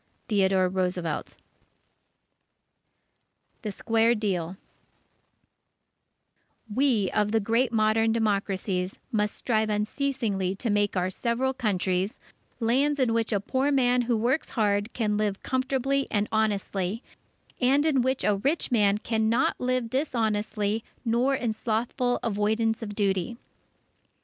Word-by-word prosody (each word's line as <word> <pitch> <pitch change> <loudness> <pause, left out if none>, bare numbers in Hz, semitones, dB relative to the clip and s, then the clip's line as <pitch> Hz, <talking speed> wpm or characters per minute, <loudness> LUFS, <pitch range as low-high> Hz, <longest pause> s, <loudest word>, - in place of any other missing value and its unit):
_ - - -42
THEODORE 190 -3 +3
ROOSEVELT 180 -4 -2 2.3
THE 215 - -4
SQUARE 225 +3 +2
DEAL 190 -4 -2 2.2
_We 240 -6 +2
of 210 -1 +1
the 225 - +3
great 230 +4 +1
modern 225 0 +2
democracies, 195 -4 -1
must 210 -2 0
strive 220 -3 0
unceasingly 210 -3 -1
to 225 +3 -2
make 205 -1 +1
our 180 +1 0
several 245 +6 -1
Countries, 195 -5 -1 0.4
lands 265 +6 +2
in 250 -4 +2
which 230 0 0
a 205 - +2
poor 265 +7 0
man 250 -2 +3
who 240 -1 0
works 250 +8 0
hard 205 -1 0
can 210 -3 0
live 210 -2 -1
comfortably 265 +1 0
and 210 -1 0
honestly, 205 -1 -1 0.6
and 275 +4 +3
in 280 -5 +3
which 260 +1 0
a 205 -1 +2
rich 280 +8 -1
man 205 -4 +3
cannot 220 +2 +1
live 255 -1 0
dishonestly 220 -5 -1 0.2
nor 240 +4 +2
in 235 -4 -1
slothful 235 +3 -1
avoidance 220 +1 0
of 205 -2 -6
duty. 195 +1 0
220 Hz, 120 wpm, -27 LUFS, 205-245 Hz, 2.3 s, THEODORE